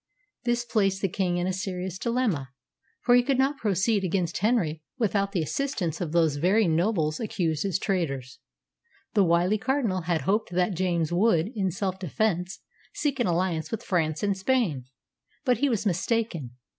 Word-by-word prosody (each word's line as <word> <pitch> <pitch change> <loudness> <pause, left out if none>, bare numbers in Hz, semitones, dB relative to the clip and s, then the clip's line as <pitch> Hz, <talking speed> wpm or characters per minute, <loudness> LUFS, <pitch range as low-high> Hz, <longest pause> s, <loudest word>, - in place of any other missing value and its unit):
This 240 0 +1
placed 195 -4 +1
the - - +4
king 180 -1 -1
in 175 - 0
a 185 - 0
serious 185 -1 -4
dilemma, 225 - 0 0.5
for 245 - +3
he 245 - +7
could 265 +1 0
not 270 +2 +2
proceed 205 0 +1
against 180 -2 -1
Henry 180 -8 +1 0.2
without 200 -4 +1
the 180 -5 0
assistance 185 - -2
of 165 -4 -2
those 160 -3 +2
very 190 +7 +3
nobles 165 -2 +1
accused 170 -7 -1
as 195 -2 +1
traitors. 140 -10 -2 0.7
The 205 - +4
wily 175 +4 +2
Cardinal 245 -7 0
had 165 -1 0
hoped 210 +3 0
that 180 +2 +1
James 170 -3 0
would, 180 -2 +3
in 195 -4 0
self 190 +1 -3
defence, 185 +1 -1 0.3
seek 280 -3 -1
an 240 - +2
alliance 170 -2 0
with 225 +1 -4
France 160 -5 0
and 200 -1 +1
Spain; 190 - 0 0.6
but 250 -2 +2
he 285 - +2
was 225 -4 -1
mistaken. 180 - -1
190 Hz, 170 wpm, -26 LUFS, 170-220 Hz, 0.7 s, he